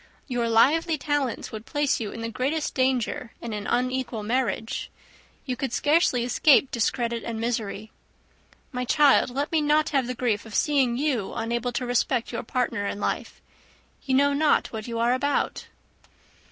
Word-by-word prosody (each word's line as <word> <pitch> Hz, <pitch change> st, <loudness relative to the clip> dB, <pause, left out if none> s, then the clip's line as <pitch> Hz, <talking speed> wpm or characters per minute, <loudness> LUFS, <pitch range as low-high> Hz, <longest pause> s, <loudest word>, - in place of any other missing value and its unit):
Your 240 Hz, -3 st, -1 dB
lively 310 Hz, +8 st, +3 dB
talents 290 Hz, -4 st, -2 dB
would 220 Hz, 0 st, -8 dB
place 290 Hz, -1 st, 0 dB
you 215 Hz, -3 st, -4 dB
in 230 Hz, -, -7 dB
the 230 Hz, -, -2 dB
greatest 285 Hz, +7 st, -1 dB
danger 255 Hz, -2 st, 0 dB
in 235 Hz, -2 st, -6 dB
an 210 Hz, -1 st, -4 dB
unequal 255 Hz, -3 st, -1 dB
marriage. 225 Hz, -1 st, -1 dB, 0.6 s
You 255 Hz, -3 st, -2 dB
could 265 Hz, -1 st, -3 dB
scarcely 290 Hz, -2 st, +2 dB
escape 270 Hz, +2 st, +4 dB
discredit 235 Hz, 0 st, -1 dB
and 230 Hz, -1 st, -4 dB
misery. 220 Hz, -2 st, -3 dB, 0.8 s
My 250 Hz, -2 st, -3 dB
child, 280 Hz, +1 st, +4 dB
let 280 Hz, +4 st, -3 dB
me 320 Hz, -2 st, +2 dB
not 300 Hz, +1 st, +2 dB
have 270 Hz, -4 st, +1 dB
the 250 Hz, -, -3 dB
grief 230 Hz, -4 st, 0 dB
of 225 Hz, -2 st, -9 dB
seeing 270 Hz, -5 st, +2 dB
you 260 Hz, -8 st, -1 dB
unable 235 Hz, +2 st, -2 dB
to 250 Hz, -, -2 dB
respect 245 Hz, 0 st, 0 dB
your 235 Hz, -, -3 dB
partner 235 Hz, -4 st, -2 dB
in 200 Hz, -, -4 dB
life. -, -, -3 dB, 0.6 s
You 265 Hz, -1 st, 0 dB
know 285 Hz, +1 st, +4 dB
not 295 Hz, -2 st, +2 dB
what 220 Hz, 0 st, -5 dB
you 230 Hz, -1 st, -4 dB
are 235 Hz, +2 st, +2 dB
about." 285 Hz, +3 st, -1 dB
250 Hz, 165 wpm, -25 LUFS, 230-280 Hz, 0.8 s, escape